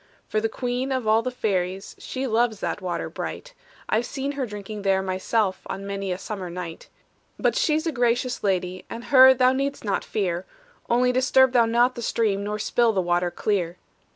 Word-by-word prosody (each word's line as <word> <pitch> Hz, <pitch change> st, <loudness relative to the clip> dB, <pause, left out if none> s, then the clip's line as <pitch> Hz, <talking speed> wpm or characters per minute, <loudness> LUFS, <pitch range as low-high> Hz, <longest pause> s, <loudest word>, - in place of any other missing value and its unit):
"For 215 Hz, -, 0 dB
the 225 Hz, -, 0 dB
queen 250 Hz, +3 st, -2 dB
of 260 Hz, -3 st, -1 dB
all 220 Hz, +1 st, +4 dB
the 255 Hz, -, -2 dB
fairies, 195 Hz, -5 st, -2 dB
She 265 Hz, +1 st, -4 dB
loves 230 Hz, -2 st, +1 dB
that -, -, -3 dB
water 180 Hz, -2 st, -3 dB
bright; -, -, -6 dB, 0.3 s
I've 225 Hz, +2 st, 0 dB
seen 275 Hz, 0 st, -3 dB
her 275 Hz, -3 st, -3 dB
drinking 210 Hz, 0 st, -7 dB
there 195 Hz, -1 st, +2 dB
myself 190 Hz, +1 st, 0 dB
On 195 Hz, -, -5 dB
many 195 Hz, -1 st, -3 dB
a 180 Hz, -, -2 dB
summer 195 Hz, -2 st, -6 dB
night. 170 Hz, -1 st, -7 dB, 0.5 s
"But -, -, +1 dB
she's 315 Hz, -10 st, +1 dB
a 325 Hz, -, 0 dB
gracious 245 Hz, -1 st, 0 dB
lady, 185 Hz, -2 st, -1 dB
And 230 Hz, +1 st, -7 dB
her 260 Hz, 0 st, +9 dB
thou 255 Hz, 0 st, +4 dB
need'st 275 Hz, -1 st, -2 dB
not 200 Hz, -, 0 dB
fear; 180 Hz, -3 st, -2 dB, 0.4 s
Only 250 Hz, +1 st, +3 dB
disturb 260 Hz, +1 st, +4 dB
thou 240 Hz, -2 st, +4 dB
not 240 Hz, +2 st, +3 dB
the 240 Hz, -, -7 dB
stream, 210 Hz, -3 st, 0 dB
Nor 210 Hz, +1 st, -2 dB
spill 230 Hz, +2 st, +2 dB
the 195 Hz, -, +1 dB
water 175 Hz, 0 st, +1 dB
clear." 180 Hz, -2 st, -1 dB
220 Hz, 190 wpm, -24 LUFS, 195-250 Hz, 0.5 s, her